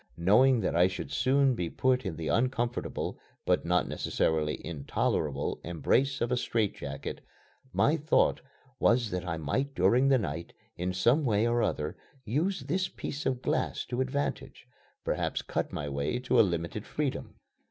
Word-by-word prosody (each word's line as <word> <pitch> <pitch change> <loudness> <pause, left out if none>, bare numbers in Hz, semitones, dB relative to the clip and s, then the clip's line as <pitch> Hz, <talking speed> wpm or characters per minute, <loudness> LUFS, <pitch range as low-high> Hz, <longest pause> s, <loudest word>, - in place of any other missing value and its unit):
Knowing 115 +8 +5
that - - -1
I 90 +2 +5
should 95 0 -6
soon 135 0 +3
be 90 -8 -2
put 130 0 +1
in 85 - -4
the 80 0 -5
uncomfortable, 120 0 -1 0.3
but - - +2
not 90 0 +2
necessarily 75 -1 0
intolerable 75 -2 -1
embrace 130 - +1
of 120 - 0
a 125 - +2
strait 110 -4 0
jacket, 70 -1 -6 0.5
my 155 +3 +3
thought 155 +1 +2 0.4
was 120 -3 +3
that 90 -1 -2
I 80 -1 -2
might 100 - -2
during 120 +9 +4
the 135 -1 +5
night, 85 - -4 0.2
in 90 +1 -2
some 120 - +3
way 110 -4 +2
or 120 0 +2
other, 75 -7 -1 0.3
use 155 - 0
this 180 +8 -1
piece 145 0 -5
of 130 -2 -1
glass - - -1
to 125 +1 -1
advantage 135 +2 -3 0.4
perhaps - - -1
cut - - -2
my 75 - -4
way 70 - -1
to 125 -1 +2
a - - +10
limited 85 +1 -1
freedom. 145 0 -3
115 Hz, 165 wpm, -29 LUFS, 85-130 Hz, 0.5 s, a